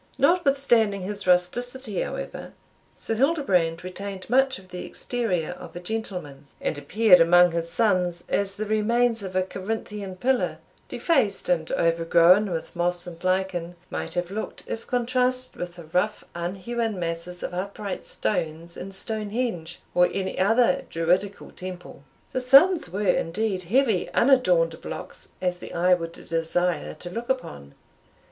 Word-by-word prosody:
Notwithstanding 275 Hz, -, +3 dB
his 200 Hz, 0 st, -5 dB
rusticity, 215 Hz, +5 st, +1 dB
however, -, -, -5 dB, 0.4 s
Sir -, -, -3 dB
Hildebrand 210 Hz, -, +1 dB
retained 190 Hz, +1 st, -6 dB
much 265 Hz, +1 st, +3 dB
of 185 Hz, -1 st, -16 dB
the 180 Hz, 0 st, -6 dB
exterior 195 Hz, -11 st, -2 dB
of 180 Hz, -, -10 dB
a -, -, -4 dB
gentleman, 180 Hz, -8 st, -5 dB
and -, -, -1 dB
appeared 180 Hz, +7 st, +5 dB
among 175 Hz, +1 st, +6 dB
his 170 Hz, 0 st, -2 dB
sons 180 Hz, -3 st, +1 dB
as 200 Hz, -1 st, -1 dB
the 215 Hz, -, -3 dB
remains 230 Hz, +2 st, +2 dB
of 190 Hz, -2 st, -6 dB
a 185 Hz, -, +3 dB
Corinthian 200 Hz, 0 st, -5 dB
pillar, 255 Hz, +7 st, 0 dB, 0.3 s
defaced 215 Hz, -, +1 dB
and 165 Hz, -3 st, +1 dB
overgrown 170 Hz, +4 st, +4 dB
with 165 Hz, 0 st, -5 dB
moss 175 Hz, +1 st, 0 dB
and 175 Hz, -1 st, -10 dB
lichen, 185 Hz, -2 st, -1 dB, 0.2 s
might 80 Hz, 0 st, -4 dB
have 175 Hz, +1 st, -2 dB
looked, 215 Hz, +2 st, -5 dB
if 225 Hz, -, -6 dB
contrasted 255 Hz, +1 st, +1 dB
with 175 Hz, 0 st, -5 dB
the 175 Hz, -, -10 dB
rough 180 Hz, +7 st, -1 dB
unhewn 195 Hz, +6 st, -3 dB
masses 170 Hz, +1 st, -4 dB
of -, -, -4 dB
upright 200 Hz, +1 st, -4 dB
stones 165 Hz, -3 st, -2 dB
in 190 Hz, -, -7 dB
Stonhenge, 210 Hz, -3 st, -3 dB, 0.2 s
or 180 Hz, 0 st, +4 dB
any 190 Hz, -1 st, -3 dB
other 225 Hz, +1 st, +3 dB
Druidical 180 Hz, +4 st, 0 dB
temple. 180 Hz, -5 st, -8 dB, 0.3 s
The 255 Hz, -, -1 dB
sons 275 Hz, -, +6 dB
were, 195 Hz, +4 st, -3 dB
indeed, 190 Hz, +2 st, 0 dB
heavy 225 Hz, -1 st, +2 dB
unadorned 180 Hz, -11 st, +3 dB
blocks -, -, -7 dB
as 180 Hz, -1 st, 0 dB
the -, -, -9 dB
eye 180 Hz, +1 st, +4 dB
would 165 Hz, -2 st, -1 dB
desire 165 Hz, +2 st, -1 dB
to 175 Hz, -, -8 dB
look 235 Hz, +5 st, -5 dB
upon. 70 Hz, -, -4 dB
185 Hz, 145 wpm, -25 LUFS, 175-225 Hz, 0.4 s, among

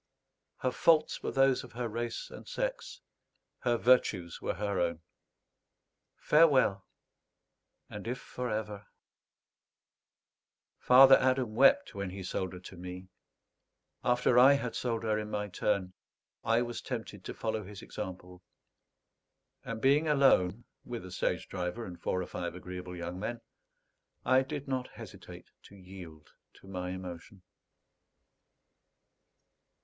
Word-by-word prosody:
Her 130 Hz, -, -1 dB
faults 155 Hz, +3 st, +3 dB
were -, -, -2 dB
those 135 Hz, -1 st, +3 dB
of 125 Hz, -, -13 dB
her 120 Hz, 0 st, -3 dB
race 115 Hz, +1 st, -4 dB
and -, -, -11 dB
sex; -, -, -4 dB, 0.6 s
her 120 Hz, -1 st, +1 dB
virtues 105 Hz, -9 st, +2 dB
were -, -, -2 dB
her 100 Hz, -1 st, -2 dB
own. 85 Hz, -2 st, -1 dB, 1.1 s
Farewell, 135 Hz, -, +4 dB, 1.0 s
and 105 Hz, +1 st, -8 dB
if 125 Hz, +2 st, -2 dB
for 125 Hz, 0 st, -5 dB
ever 105 Hz, -1 st, -4 dB, 1.9 s
Father 135 Hz, +1 st, +8 dB
Adam 130 Hz, -3 st, +1 dB
wept 140 Hz, -, +4 dB
when 100 Hz, -1 st, -4 dB
he 95 Hz, +1 st, -7 dB
sold 95 Hz, 0 st, -3 dB
her 90 Hz, -, -8 dB
to 95 Hz, -, -11 dB
me; 90 Hz, +1 st, -8 dB, 0.9 s
after 125 Hz, 0 st, +3 dB
I 135 Hz, +3 st, +8 dB
had 125 Hz, -4 st, -2 dB
sold 115 Hz, -2 st, -2 dB
her 110 Hz, -1 st, +1 dB
in 105 Hz, 0 st, -5 dB
my 105 Hz, -1 st, -3 dB
turn, 95 Hz, 0 st, -1 dB, 0.5 s
I 115 Hz, +2 st, +2 dB
was 120 Hz, -1 st, -5 dB
tempted 110 Hz, -6 st, -6 dB
to -, -, -6 dB
follow 110 Hz, -1 st, -2 dB
his 100 Hz, 0 st, -10 dB
example; 90 Hz, -1 st, -8 dB, 1.2 s
and 115 Hz, -1 st, -5 dB
being 140 Hz, +6 st, +3 dB
alone 125 Hz, -8 st, +3 dB, 0.2 s
with 120 Hz, -5 st, -6 dB
a 95 Hz, -, -9 dB
stage 95 Hz, -, -1 dB
driver 90 Hz, +5 st, -4 dB
and 90 Hz, -1 st, -10 dB
four 90 Hz, -, -1 dB
or -, -, -5 dB
five 85 Hz, 0 st, -5 dB
agreeable 90 Hz, 0 st, -7 dB
young 90 Hz, +1 st, -5 dB
men, 115 Hz, +3 st, -4 dB, 0.8 s
I 130 Hz, 0 st, +5 dB
did 140 Hz, +1 st, -5 dB
not 130 Hz, -1 st, -2 dB
hesitate -, -, -12 dB
to -, -, -15 dB
yield 90 Hz, -5 st, -12 dB, 0.2 s
to -, -, -19 dB
my 90 Hz, -2 st, -4 dB
emotion. 90 Hz, +1 st, -8 dB
110 Hz, 135 wpm, -31 LUFS, 90-125 Hz, 1.9 s, Father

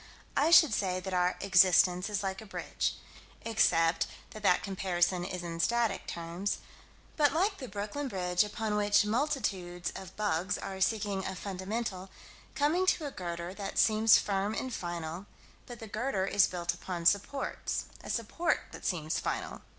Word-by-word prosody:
I 300 Hz, -, +3 dB
should 330 Hz, -7 st, +7 dB
say 185 Hz, -3 st, 0 dB
that 190 Hz, +1 st, -6 dB
our 180 Hz, 0 st, +1 dB
"existence" 185 Hz, 0 st, +5 dB
is 205 Hz, -1 st, -2 dB
like 190 Hz, +1 st, -3 dB
a -, -, -10 dB
bridge -, -, -2 dB, 0.5 s
except 165 Hz, -7 st, +3 dB, 0.2 s
that 215 Hz, -, -9 dB
that 180 Hz, -3 st, +3 dB
comparison 180 Hz, -2 st, 0 dB
is 180 Hz, 0 st, -4 dB
in 165 Hz, -1 st, -5 dB
static 230 Hz, 0 st, +1 dB
terms 170 Hz, +4 st, -3 dB, 0.6 s
but 290 Hz, -2 st, +4 dB
like 390 Hz, +5 st, +1 dB
the 260 Hz, -, -6 dB
Brooklyn 210 Hz, +8 st, -4 dB
Bridge, 180 Hz, -5 st, +1 dB
upon 210 Hz, 0 st, -3 dB
which 205 Hz, 0 st, +3 dB
multitudes 210 Hz, -, -1 dB
of 190 Hz, -1 st, -9 dB
bugs 200 Hz, -2 st, 0 dB
are 190 Hz, -1 st, -6 dB
seeking 200 Hz, -2 st, 0 dB
a 190 Hz, -, -4 dB
fundamental 195 Hz, 0 st, -4 dB, 0.5 s
coming 325 Hz, +6 st, +2 dB
to 320 Hz, -, +2 dB
a 285 Hz, -, -4 dB
girder 175 Hz, -2 st, -5 dB
that 195 Hz, -1 st, -6 dB
seems 220 Hz, 0 st, +6 dB
firm 200 Hz, +1 st, -1 dB
and 260 Hz, +1 st, -3 dB
final 175 Hz, 0 st, -5 dB, 0.4 s
but 240 Hz, -, -8 dB
the 225 Hz, -, -7 dB
girder 215 Hz, -2 st, -1 dB
is 195 Hz, 0 st, +4 dB
built 175 Hz, -1 st, -2 dB
upon 175 Hz, -2 st, -6 dB
supports. 205 Hz, +10 st, 0 dB, 0.2 s
A -, -, -8 dB
support 235 Hz, +9 st, 0 dB
then -, -, -9 dB
seems 160 Hz, -4 st, -1 dB
final. -, -, -3 dB
195 Hz, 160 wpm, -31 LUFS, 180-220 Hz, 0.6 s, should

